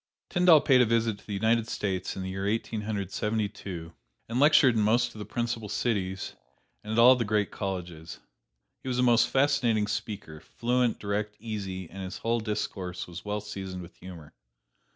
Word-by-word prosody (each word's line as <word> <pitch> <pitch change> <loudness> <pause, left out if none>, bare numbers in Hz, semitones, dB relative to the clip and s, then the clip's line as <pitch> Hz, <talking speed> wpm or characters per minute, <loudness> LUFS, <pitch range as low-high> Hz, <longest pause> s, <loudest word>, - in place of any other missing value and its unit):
Tyndall 175 -4 +6
paid 130 -3 +5
a - - +5
visit 115 -2 +1
to - - -21
the 105 - -4
United 110 +2 +2
States 95 -4 -2
in 95 - -4
the 95 - -4
year 95 +1 -3
Eighteen 110 0 -1
Hundred 100 -3 -3
Seventy 105 +1 0
two, 85 -5 -8 0.3
and 115 +2 -2
lectured 145 -3 +6
in 110 - +1
most 120 +3 +2
of 110 - -11
the 105 - -5
principal 115 0 -3
cities, 95 -4 -2 0.5
and 105 - -6
at - - -1
all 125 +2 +8
the 125 - 0
great 105 -1 0
colleges. 90 -5 -5 0.6
He - - -10
was 125 -1 -1
a 125 - +3
most 120 -1 +5
fascinating 135 -6 +2
speaker, 100 -7 -5
fluent, 120 +6 0
direct, 105 +1 -2
easy, 100 -5 -5
and 95 +4 -9
his 95 0 -5
whole 115 +1 0
discourse 95 -4 -3
was 85 -1 -9
well 105 0 -2
seasoned 95 -3 -6
with 85 - -13
humor. 85 -5 -11
105 Hz, 190 wpm, -28 LUFS, 95-115 Hz, 0.6 s, all